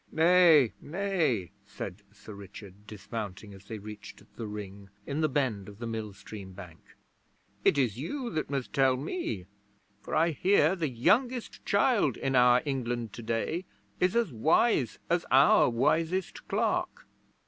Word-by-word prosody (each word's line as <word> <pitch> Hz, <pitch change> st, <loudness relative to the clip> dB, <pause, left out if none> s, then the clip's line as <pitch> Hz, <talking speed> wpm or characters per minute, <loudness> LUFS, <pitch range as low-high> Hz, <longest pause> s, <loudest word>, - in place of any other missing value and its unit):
'Nay 165 Hz, -6 st, +5 dB
nay,' 160 Hz, -, -1 dB
said 100 Hz, -1 st, -8 dB
Sir 105 Hz, 0 st, -12 dB
Richard, 100 Hz, 0 st, -12 dB
dismounting 105 Hz, -1 st, -7 dB
as 95 Hz, 0 st, -14 dB
they 110 Hz, +2 st, -6 dB
reached 105 Hz, 0 st, -10 dB
the 115 Hz, -, -5 dB
Ring, 100 Hz, -1 st, -8 dB, 0.2 s
in 145 Hz, +3 st, -2 dB
the 155 Hz, -, +2 dB
bend 125 Hz, -9 st, -1 dB
of 100 Hz, -, -13 dB
the 120 Hz, -, -6 dB
mill 110 Hz, -2 st, -4 dB
stream 100 Hz, -1 st, -10 dB
bank. 90 Hz, -4 st, -11 dB, 0.8 s
'It -, -, +4 dB
is 120 Hz, -5 st, +1 dB
you 245 Hz, -, -4 dB
that 155 Hz, -, -3 dB
must 135 Hz, -3 st, -3 dB
tell 135 Hz, -2 st, +3 dB
me, 135 Hz, -, -4 dB, 0.6 s
for -, -, -5 dB
I 165 Hz, +2 st, +3 dB
hear 180 Hz, +1 st, +3 dB
the 165 Hz, -5 st, -2 dB
youngest 235 Hz, -, 0 dB
child 200 Hz, -, +2 dB
in 135 Hz, 0 st, -1 dB
our 125 Hz, 0 st, +5 dB
England 120 Hz, -5 st, -3 dB
today 120 Hz, +10 st, -3 dB, 0.3 s
is 180 Hz, +3 st, +2 dB
as 230 Hz, -, +1 dB
wise 145 Hz, -, +2 dB
as 175 Hz, 0 st, +1 dB
our 135 Hz, -1 st, +6 dB
wisest 165 Hz, +9 st, 0 dB
clerk.' -, -, -1 dB
125 Hz, 150 wpm, -29 LUFS, 105-165 Hz, 0.8 s, our